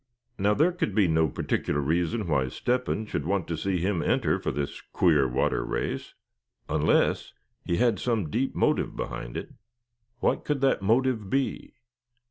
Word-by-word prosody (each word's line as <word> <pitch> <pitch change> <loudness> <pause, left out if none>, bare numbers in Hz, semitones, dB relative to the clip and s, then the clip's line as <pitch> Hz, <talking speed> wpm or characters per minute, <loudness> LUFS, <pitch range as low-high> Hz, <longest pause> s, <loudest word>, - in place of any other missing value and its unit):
Now, 105 +2 +3
there 160 +8 +4
could 170 - -2
be 105 -4 +4
no 80 -1 +2
particular 70 +2 -1
reason 85 +8 0
why 70 -5 +1
Step 125 - -1
hen 110 - -1
should 90 - -3
want 95 +2 -1
to 85 - -2
see 95 +4 -1
him 90 0 0
enter - - +1
for - - -2
this 70 -1 -3
queer 75 -7 +3
water 60 - 0
race, - - -3 0.5
unless - - +1 0.3
he 85 - -1
had 115 -5 +2
some 110 -10 -1
deep 130 +3 -1
motive - - +1
behind - - -5
it. - - -6 0.7
What - - +1
could 150 -2 -1
that 135 -6 +2
motive 115 0 +1
be? 135 +3 -2
95 Hz, 165 wpm, -27 LUFS, 80-120 Hz, 0.7 s, there